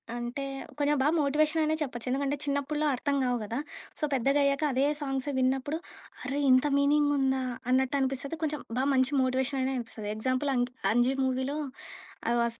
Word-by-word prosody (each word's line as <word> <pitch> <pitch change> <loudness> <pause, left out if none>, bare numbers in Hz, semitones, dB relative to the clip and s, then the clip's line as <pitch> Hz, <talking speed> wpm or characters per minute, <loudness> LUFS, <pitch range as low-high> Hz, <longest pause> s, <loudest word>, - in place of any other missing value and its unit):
అంటే, 240 +3 -4 0.4
కొంచెం 290 0 +2
బాగా 295 +4 +3
మోటివేషననే 310 +2 +2
చెప్పొచ్చు. 250 -4 -4
ఎందుకంటే, 280 +1 0
చిన్నప్పట్లో 290 +1 -1
అర్థం 280 +3 -1
కావు 245 -1 +1
కదా! 230 +5 -3 0.4
సో, - - -7
పెద్దగ 270 +2 +2
అయ్యాక 280 +1 +1
అదే 265 +2 +2 0.2
సాంగ్స్ 270 -1 -2
విన్నప్పుడు, 265 +4 +1 0.5
అరె! 280 +1 -2
ఇంత 255 +2 +5
మీనింగుందా 280 -2 +2 0.3
అన్నట్టు 265 +2 +2
అనిపిస్తది 270 +4 -2
కొంచెం 300 -3 -1 0.2
బాగా 265 +2 +1
మంచి 260 +2 +3
మోటివేషననే 260 +1 0
అనిపిస్తది. 225 -3 -6
ఎగ్జాంపుల్ 255 +5 0
అంక్ 245 0 0 0.2
'అంజి' 245 +4 +3
మూవీలో, 260 +3 -1 0.7
ఆహ్, 240 - +2
వాస్ 235 0 -1
270 Hz, 155 wpm, -29 LUFS, 255-285 Hz, 0.7 s, ఇంత